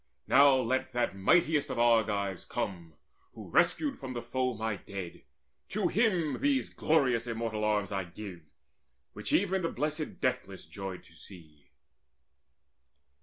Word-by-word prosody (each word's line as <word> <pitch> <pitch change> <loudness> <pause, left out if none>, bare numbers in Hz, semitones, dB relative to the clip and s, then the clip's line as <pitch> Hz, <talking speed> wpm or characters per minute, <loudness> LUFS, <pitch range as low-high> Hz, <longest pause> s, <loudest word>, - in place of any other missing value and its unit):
Now 140 +1 +6
let 130 +1 0
that 120 -5 0
mightiest 150 - +3
of - - -3
the 120 - +2
Argives 105 -5 +2
come 85 -5 -5 0.4
Who - - -10
rescued 290 -3 +2
from 130 -1 -6
the 120 - -4
foe 130 -2 -1
my 110 -1 -2
dead: 95 -2 -8 0.5
to - - 0
him 185 -9 +1
These 275 -1 +1
glorious 130 -7 +2
and 115 - -3
immortal 110 -2 -2
arms 105 -2 +1
I 95 -2 -2
give 90 0 -9 0.7
Which - - -6
even 190 -1 +2
the 165 - 0
blessed 150 +3 -3
Deathless 100 -7 -2
joyed 95 -3 -7
to - - -20
see." 80 -5 -14
115 Hz, 145 wpm, -30 LUFS, 100-145 Hz, 0.7 s, Now